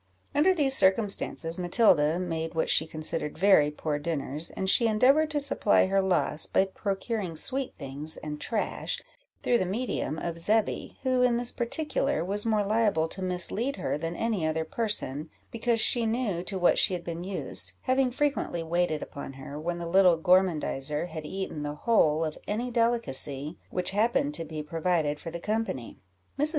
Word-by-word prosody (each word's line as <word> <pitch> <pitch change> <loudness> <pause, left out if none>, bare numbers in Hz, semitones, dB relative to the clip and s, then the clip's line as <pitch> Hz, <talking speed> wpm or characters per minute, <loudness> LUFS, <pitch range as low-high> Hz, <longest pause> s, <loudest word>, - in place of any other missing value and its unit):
Under 305 +6 +4
these 275 -5 +4
circumstances, 190 -5 +2
Matilda 175 -5 +3
made 165 -3 -4
what 160 - +1
she 160 - +3
considered 155 -1 -2
very 180 -5 +5
poor 150 0 -3
dinners, 150 0 -2
and 190 - -4
she 230 +4 +4
endeavoured 265 +8 +3
to 300 -1 0
supply 280 -7 +3
her 195 +1 +2
loss 180 -5 +1
by 190 - +2
procuring 195 -1 -4
sweet 265 - -1
things 145 +2 -5
and 150 -1 -7
trash, 220 -3 -2 0.4
through 240 -1 +2
the - - 0
medium 195 - -3
of 170 0 -4
Zebby, 215 +5 0
who, 255 -1 +1
in 245 -1 +3
this 240 0 -2
particular, 285 - -1
was 205 +4 +2
more 215 -2 +1
liable 210 -6 +1
to 190 - -2
mislead 185 +9 -1
her - - -2
than 165 +3 -4
any 220 -5 -1
other 160 0 -1
person, 160 - -1 0.2
because 230 0 0
she 230 +1 +3
knew 220 -6 -1
to 195 - -3
what 175 -1 +3
she 185 - +3
had 175 - -6
been 170 0 -5
used, 190 +1 -1
having 260 0 +2
frequently 265 - -1
waited 165 -2 -1
upon 140 -1 -8
her, 135 +2 -8
when 170 +2 -3
the 170 - -5
little 180 0 +4
gormandizer 160 -4 +1
had 155 -2 -7
eaten 190 -5 -5
the 145 0 -4
whole 160 -5 +2
of 155 - -6
any 235 +4 -2
delicacy 175 - +1
which 180 0 -2
happened 205 -8 +1
to 165 - -2
be 155 -1 -6
provided 160 -1 -1
for 165 - -7
the 170 +1 -6
company. 210 - -3 0.4
Mrs. 295 +2 +4
180 Hz, 175 wpm, -27 LUFS, 160-230 Hz, 0.4 s, very